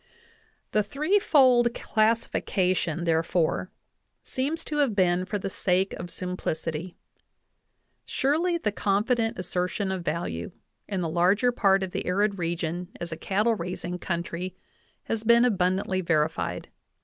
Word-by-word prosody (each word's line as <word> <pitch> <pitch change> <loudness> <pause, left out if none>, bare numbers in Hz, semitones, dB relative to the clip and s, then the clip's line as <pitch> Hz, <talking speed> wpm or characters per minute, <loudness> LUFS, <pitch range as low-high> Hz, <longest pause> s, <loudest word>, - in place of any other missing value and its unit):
The 215 - +3
threefold 265 - +3
classification 185 -6 0
therefore 165 +2 +1 0.5
seems 285 +6 -2
to 300 - -4
have 275 -8 +2
been 180 -1 +2
for 205 +2 -2
the 195 - -4
sake 190 0 0
of 175 - -6
simplicity; 170 -2 -4 1.1
surely 330 +6 +1
the 220 -10 -1
confident 225 +4 +1
assertion 185 +2 -2
of 185 -2 -3
value 150 - -3 0.3
in 195 -3 -2
the 170 - -1
larger 185 +9 +3
part 195 -5 +3
of 185 - -4
the - - -4
arid 200 +2 +1
region 170 +1 -2
as 170 0 -5
a - - -3
cattle 205 +7 +1
raising 180 -2 -4
country 175 +1 -3 0.5
has 225 -1 -3
been 235 +2 +5
abundantly 185 -3 +1
verified. 160 -2 -1
190 Hz, 125 wpm, -26 LUFS, 175-225 Hz, 1.1 s, been